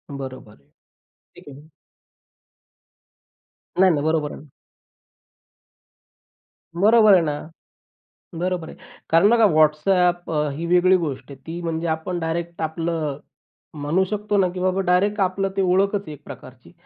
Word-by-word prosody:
बरोबर, 130 -5 -9 0.8
ठीक - - -15
आहे. 145 +2 -13 2.1
नाही 190 0 +6
नाही. 145 -2 -1
बरोबर 155 -2 0
आहे. 150 - -11 2.3
बरोबर 215 +3 +5
आहे 185 - +6
ना, 150 +1 -4 0.9
बरोबर 175 -1 -3
आहे. - - -11 0.3
कारण 165 +5 +5
बघा, 230 -1 +4
WhatsApp 175 +3 +2
अ, 150 -1 0
ही 165 +2 -4
वेगळी 180 +2 +4
गोष्ट 140 -6 -5
आहे. 140 - -9
ती 165 +2 -6
म्हणजे 165 0 -3
आपण 160 +3 -3
डायरेक्ट 170 +1 -4
आपलं 160 -2 -3 0.6
म्हणू 160 +6 +1
शकतो 210 0 -2
ना, 190 -2 +3
की 180 - -5
बाबा, 185 +1 0
डायरेक्ट 195 +3 +1
आपलं 195 +1 0
ते 195 - +2
ओळखच 195 +2 +1
आहे 155 - -7
एक 145 -1 -12
प्रकारची - - -13
170 Hz, 130 wpm, -22 LUFS, 155-185 Hz, 2.3 s, नाही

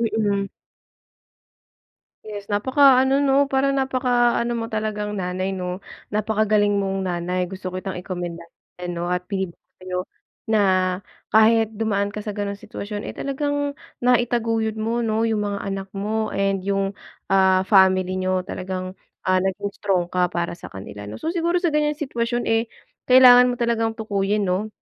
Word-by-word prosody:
mm. 210 -3 0 1.8
Yes 205 -2 -8
napakaano, 265 +4 +4
'no 280 0 +4
para 270 +1 +2
napakaano 245 -3 +1
mo 230 - -3
talagang 210 -1 -2
nanay, 185 0 -2
'no? 180 0 -4 0.3
Napakagaling 215 0 +1
mong 195 0 -2
nanay, 180 0 -1
gusto 190 -1 -6
kitang 185 0 -4
ikomendahan 175 -2 -6 0.4
'no 175 0 -3
at 180 0 -2
sabihin 190 -4 -2
sa 185 - -22
'yo 180 0 -2 0.5
na 220 -1 +3 0.7
kahit 220 0 +5
dumaan 205 -2 0
ka 210 - -4
sa 210 - -4
ganong 200 -1 -3
sitwasyon, 210 0 -6
eh, - - -5
talagang 285 +1 -2 0.3
naitaguyod 230 -3 +1
mo, 230 +2 -1
'no, 225 +1 +1
yung 220 -2 0
mga 200 -1 -2
anak 195 0 -4
mo 215 +2 -2
and 195 -1 0
yung, 195 0 -1 0.3
ah, 190 -1 +3
family 185 -2 +4
niyo, 185 0 -1
talagang, 185 0 -5 0.3
ah, 185 0 +3
naging 200 +1 -2
strong 185 -4 0
ka 180 0 0
para 170 -1 -2
sa - - -11
kanila, 100 +1 -9
'no? 105 +1 -7
So 330 +2 -2
siguro 340 +1 +1
sa 345 -4 0
ganyan 300 -1 +1
sitwasyon, 240 -5 -2
eh, 225 0 +1 0.4
kailangan 250 -1 +8
mo 245 - -1
talagang 230 -2 +1
tukuyin, 205 -1 0
'no, 190 +4 -1
210 Hz, 150 wpm, -22 LUFS, 190-235 Hz, 1.8 s, kailangan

